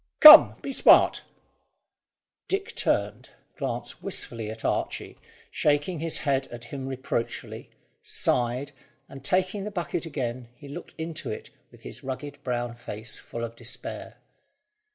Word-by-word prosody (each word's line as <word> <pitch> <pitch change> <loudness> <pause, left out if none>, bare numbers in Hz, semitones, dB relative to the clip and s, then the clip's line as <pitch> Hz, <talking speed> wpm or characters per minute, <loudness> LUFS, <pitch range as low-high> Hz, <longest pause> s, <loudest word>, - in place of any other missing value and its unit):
"Come; 305 +1 +11
be 275 - -3
smart!" - - +6 1.3
Dick 390 0 -2
turned, - - -1 0.3
glanced - - -4
wistfully 115 -3 -5
at 110 +1 -7
Archy, - - -2 0.3
shaking 150 +3 +1
his 165 0 +1
head 135 -2 +1
at 120 0 -10
him 135 +1 -6
reproachfully, 130 -3 -4 0.3
sighed, 125 +4 0 0.4
and, 135 -1 -11
taking 185 +5 +1
the 210 - -4
bucket 175 -4 -3
again, 125 -5 -4
he 145 - -13
looked 140 - -9
into 160 0 -5
it 110 - -7 0.2
with - - -19
his - - -9
rugged 140 +2 -6
brown 120 -2 -2
face 115 -2 -6
full 115 - -7
of 115 0 -5
despair. 120 0 -7
135 Hz, 135 wpm, -26 LUFS, 120-160 Hz, 1.3 s, Come